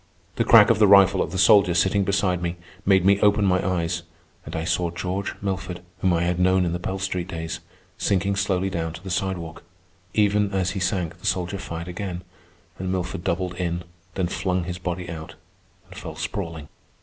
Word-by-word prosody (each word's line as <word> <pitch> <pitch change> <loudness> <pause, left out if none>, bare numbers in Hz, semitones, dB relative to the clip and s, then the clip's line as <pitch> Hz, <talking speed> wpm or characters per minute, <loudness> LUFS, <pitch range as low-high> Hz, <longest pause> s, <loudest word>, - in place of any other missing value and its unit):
The - - +3
crack - - +7
of - - +1
the 105 - +6
rifle 100 -1 +6
of - - -2
the 95 - -3
soldier 95 -3 +5
sitting 95 +4 +3
beside 95 -2 +1
me 85 0 -2 0.3
made 95 -2 +4
me 100 +1 +5
open 105 0 +4
my 95 -1 +2
eyes, 85 -2 -1 0.4
and 80 - -7
I 80 - -2
saw 85 +1 0
George 90 +3 -3
Milford, 95 -2 -3 0.2
whom 95 - +2
I 85 0 +1
had 90 0 0
known 95 0 +3
in 85 - -1
the 85 - -2
Pell 95 +2 -3
Street 90 -2 -3
days, 80 -2 -5 0.4
sinking 100 +1 +1
slowly 95 -1 0
down 80 -2 -3
to 85 - -10
the 95 - -6
sidewalk. 90 -3 -3 0.5
Even 105 -1 +2
as 95 -1 0
he 100 - -3
sank 90 -3 -1
the - - -5
soldier 90 +1 -1
fired 85 0 -6
again, 90 0 -5 0.6
and 95 0 -2
Milford 90 -2 -3
doubled 90 +1 -1
in, 85 -1 -2 0.3
then 95 - 0
flung 90 0 -1
his 90 +1 -5
body 90 0 -4
out, 80 0 -8 0.5
and - - -14
fell 80 - -7
sprawling. 85 -2 -5
90 Hz, 195 wpm, -24 LUFS, 85-95 Hz, 0.6 s, crack